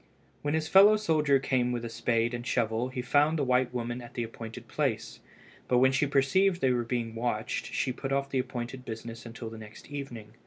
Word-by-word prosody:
When 145 +1 0
his 160 0 -1
fellow 200 +5 +7
soldier 155 -8 +3
came 130 -2 0
with 120 -1 -2
his 115 -1 -6
spade 115 0 +1
and 120 0 -4
shovel 115 0 0
he 130 -1 -4
found 145 +5 +3
the 145 - +1
white 125 -1 +2
woman 120 0 -3
at 120 - -12
the 120 - -1
appointed 115 0 -8
place, - - -2 0.5
but 125 - +3
when 130 +1 +5
she 140 +2 +2
perceived 175 +7 +3
they 130 -6 +3
were 120 -2 0 0.3
watched 115 0 -2
she 130 - -1
put 135 +2 -5
off 140 0 +1
the 135 - +1
appointed 125 0 -4
business 115 0 -7
until 115 0 -7
the 115 - -9
next 110 +6 -12
evening. 120 -7 -7
125 Hz, 205 wpm, -29 LUFS, 115-140 Hz, 0.5 s, fellow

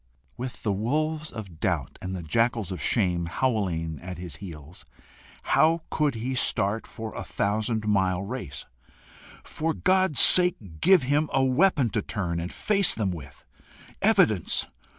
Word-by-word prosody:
With 125 0 -7
the 105 - 0
wolves 155 +9 -1
of 95 -8 -9
doubt 85 -9 -2
and 95 0 -4
the 90 - -6
jackals 115 +4 0
of 90 - -5
shame 90 -6 +1
howling 85 - -1
at 90 0 -7
his 85 -5 -7
heels, 80 -3 -10 0.6
how 160 +1 +3
could 150 -4 +1
he 120 +4 -3
start 110 -3 +1
for 110 -1 -7
a - - -5
thousand 105 +2 -1
mile 95 -3 +1
race! 100 - -6 0.8
For 160 +1 -3
God's 185 -5 +2
sake 115 - +4
give 185 -4 +5
him 145 +4 +1
a 135 - +2
weapon 135 - +2
to 105 - 0
turn 90 -5 -3
and 85 +2 -5
face 200 -3 +2
them 100 -4 -1
with! 70 -5 -10 0.6
Evidence! - - +3
110 Hz, 150 wpm, -26 LUFS, 90-135 Hz, 0.8 s, give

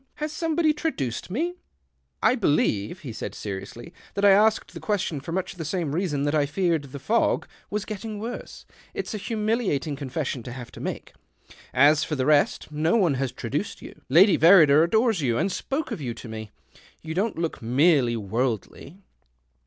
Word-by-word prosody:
Has 300 0 -4
somebody 320 0 +1
tra 320 +2 -1
duced 130 - -4
me? 320 - -1 0.2
" 65 -2 -47
" 65 0 -29
I - - +5
believe," 150 - 0
he 130 -8 -7
said - - -6
seriously, 105 - -7
" - - -25
tliat 200 - +1
I 200 - +8
asked 215 +3 +3
the - - -7
question 195 -8 -1
for 165 - -8
much 185 +2 -2
the 175 -3 -6
same 160 -2 -2
reason 160 -5 -1
that 145 +1 0
I 150 -2 +2
feared 165 -1 0
the 140 +1 -9
fog 225 - +1 0.2
was 210 0 -2
getting 215 0 -6
w^orse. 235 +3 -7 0.3
It's - - -4
a 215 - -3
humiliating 210 - -1
confession 135 -1 -3
to 125 - -8
have 120 -2 -9
to - - -11
make. - - -5 0.6
As 145 +4 +5
for 160 - -2
the 130 -2 -1
rest, 150 0 +2
no 155 +6 +1
one 185 -10 +3
has 135 -2 -1
traduced 130 - -4
you. - - -12
Lady 180 +8 +6
Verrider 160 -4 +7
adores 220 +2 +2
you, 120 -4 +1
and 190 - 0
spoke 275 +10 -3
of - - -4
you 120 -4 -4
to - - -10
me. 110 -1 -7 0.5
You 160 0 -5
don't 205 +6 -1
look 165 -1 -3
merely 125 0 +3
worldly." 115 - -3
160 Hz, 190 wpm, -25 LUFS, 130-205 Hz, 0.6 s, I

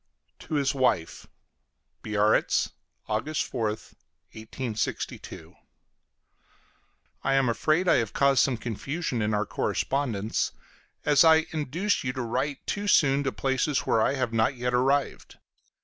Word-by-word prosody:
TO 155 - -5
HIS 140 -2 +1
WIFE 125 - 0 0.7
BIARRITZ, 105 0 +1 0.3
August 115 +8 -2
4th, 110 -4 -3 0.4
1862. 110 0 -5 1.7
I 135 0 +2
am 135 -1 +3
afraid 155 - +1
I - - +5
have 115 -3 -1
caused 140 -1 +3
some 130 -3 +1
confusion 125 +4 -3
in 105 0 0
our 105 +1 0
correspondence, 115 -4 -1 0.5
as 145 0 +5
I 160 -1 +5
induced 160 +7 -1
you 125 -1 -2
to 130 - -4
write 135 +4 -3
too 205 0 -3
soon 145 -7 +4
to 135 - 0
places 135 +1 0
where 115 - +1
I 135 - +2
have 130 -4 -2
not 115 +4 +2
yet 125 0 -2
arrived. 135 +3 0
130 Hz, 130 wpm, -27 LUFS, 115-145 Hz, 1.7 s, I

